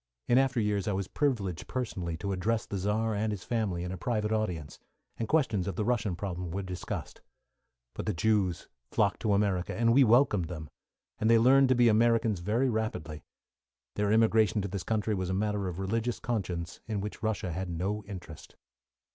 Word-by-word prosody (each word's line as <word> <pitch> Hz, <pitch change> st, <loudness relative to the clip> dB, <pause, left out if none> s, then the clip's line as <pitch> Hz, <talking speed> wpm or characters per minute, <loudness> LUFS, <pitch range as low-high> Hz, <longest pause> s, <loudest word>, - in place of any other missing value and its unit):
In 120 Hz, -, +5 dB
after 135 Hz, -2 st, +2 dB
years 105 Hz, -2 st, 0 dB
I 105 Hz, -, +1 dB
was 95 Hz, -1 st, -2 dB
privileged 100 Hz, -, -1 dB
personally 95 Hz, -10 st, -3 dB
to 100 Hz, +4 st, -3 dB
address 110 Hz, +4 st, 0 dB
the 100 Hz, -, -4 dB
Czar 110 Hz, +3 st, 0 dB
and 105 Hz, +1 st, 0 dB
his 100 Hz, -3 st, -5 dB
family, 105 Hz, -7 st, -1 dB
in 90 Hz, -, -4 dB
a 95 Hz, -, -6 dB
private 105 Hz, 0 st, -1 dB
audience, 90 Hz, -10 st, -2 dB, 0.4 s
and 115 Hz, -, -2 dB
questions 110 Hz, -, +1 dB
of 95 Hz, -, -3 dB
the 105 Hz, -, -1 dB
Russian 110 Hz, -6 st, 0 dB
problem 90 Hz, -1 st, -4 dB
were 95 Hz, +4 st, -3 dB
discussed; 90 Hz, -1 st, -6 dB, 0.7 s
but -, -, -6 dB
the -, -, +2 dB
Jews 95 Hz, -3 st, +1 dB, 0.2 s
flocked 100 Hz, +1 st, +1 dB
to 105 Hz, -3 st, +1 dB
America, 100 Hz, -3 st, +1 dB
and 115 Hz, 0 st, +3 dB
we 135 Hz, +2 st, +7 dB
welcomed 115 Hz, -6 st, +4 dB
them, 80 Hz, -3 st, -7 dB, 0.5 s
and 110 Hz, -, +2 dB
they 115 Hz, -, +7 dB
learned 130 Hz, +3 st, +5 dB
to 130 Hz, -, +4 dB
be 120 Hz, 0 st, +5 dB
Americans 115 Hz, -2 st, +3 dB
very 110 Hz, +9 st, +1 dB
rapidly. 110 Hz, -, -3 dB, 0.7 s
Their 105 Hz, 0 st, 0 dB
immigration 110 Hz, -1 st, +4 dB
to -, -, -2 dB
this 95 Hz, 0 st, -4 dB
country 110 Hz, +3 st, -1 dB
was 95 Hz, -2 st, -2 dB
a 95 Hz, -, 0 dB
matter 105 Hz, -1 st, -1 dB
of 90 Hz, -2 st, -5 dB
religious 115 Hz, +5 st, -1 dB
conscience, 90 Hz, -8 st, -3 dB
in 110 Hz, -3 st, -2 dB
which 105 Hz, +1 st, -6 dB
Russia 110 Hz, -4 st, -1 dB
had 90 Hz, +2 st, -3 dB
no 95 Hz, +5 st, -2 dB
interest. 90 Hz, -6 st, -10 dB
105 Hz, 190 wpm, -30 LUFS, 95-115 Hz, 0.7 s, we